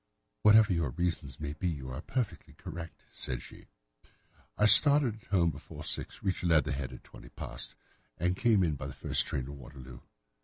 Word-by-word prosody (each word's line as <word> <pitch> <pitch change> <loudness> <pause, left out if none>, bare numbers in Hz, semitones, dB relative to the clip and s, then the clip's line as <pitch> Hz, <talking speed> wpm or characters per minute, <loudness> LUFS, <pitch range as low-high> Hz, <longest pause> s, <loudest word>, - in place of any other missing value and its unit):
"Whatever 105 -1 +6
your 85 -5 0
reasons 80 -2 -3
may 75 -1 -4
be, 85 +4 -3
you 65 -5 -5
are 65 - -5
perfectly 110 -10 -4
correct," 85 0 -9
said - - -4
she. - - -14 0.9
"I 105 - +4
started 125 0 +6
from 100 - -1
home 85 -1 +4
before 75 +1 -10
six, - - -6
reached 95 -3 -1
Leatherhead 70 -5 +1
at - - -11
twenty - - -14
past, - - -7 0.4
and 90 +2 0
came 110 -2 +3
in 80 -3 +1
by 65 -2 -5
the 70 - -8
first - - +1
train 65 - -2
to 70 - -8
Waterloo. 65 -2 -11
80 Hz, 180 wpm, -31 LUFS, 70-95 Hz, 0.9 s, Whatever